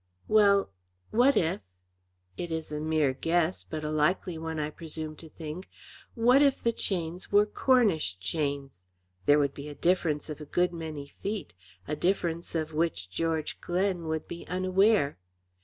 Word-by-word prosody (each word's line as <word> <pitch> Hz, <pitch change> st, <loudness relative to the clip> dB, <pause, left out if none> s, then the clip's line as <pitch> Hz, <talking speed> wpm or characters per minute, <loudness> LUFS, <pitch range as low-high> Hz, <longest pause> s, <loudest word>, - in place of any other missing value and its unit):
"Well, 200 Hz, -, +4 dB, 0.4 s
what 250 Hz, +5 st, +5 dB
if 165 Hz, -3 st, +1 dB, 0.7 s
it 170 Hz, -, -5 dB
is 160 Hz, -1 st, -3 dB
a 150 Hz, -, -2 dB
mere 155 Hz, -3 st, +2 dB
guess, 165 Hz, +5 st, 0 dB
but 155 Hz, -1 st, -6 dB
a 150 Hz, -, -2 dB
likely 160 Hz, +4 st, +1 dB
one, 160 Hz, 0 st, -4 dB
I 150 Hz, 0 st, -2 dB
presume 155 Hz, -1 st, -6 dB
to 160 Hz, -, -12 dB
think, 160 Hz, +4 st, -7 dB, 0.5 s
what 245 Hz, +4 st, +5 dB
if 280 Hz, -2 st, +3 dB
the 235 Hz, -, +3 dB
chains 180 Hz, -4 st, -3 dB
were 205 Hz, +1 st, +6 dB
Cornish 210 Hz, -, +2 dB
chains? 140 Hz, -, -3 dB, 0.4 s
There 145 Hz, -, +7 dB
would 140 Hz, -2 st, +2 dB
be 145 Hz, +1 st, -7 dB
a 145 Hz, -, -8 dB
difference 170 Hz, -4 st, +1 dB
of 155 Hz, -1 st, -7 dB
a -, -, -6 dB
good 175 Hz, +4 st, +1 dB
many 160 Hz, -4 st, -5 dB
feet, 200 Hz, +8 st, -5 dB, 0.3 s
a 150 Hz, -, -1 dB
difference 170 Hz, 0 st, -1 dB
of 160 Hz, -1 st, -2 dB
which 150 Hz, -, -1 dB
George 160 Hz, -, -2 dB
Glen 180 Hz, -1 st, 0 dB
would 160 Hz, -1 st, -2 dB
be 170 Hz, -, -7 dB
unaware. 185 Hz, -, +2 dB
165 Hz, 160 wpm, -29 LUFS, 150-185 Hz, 0.7 s, There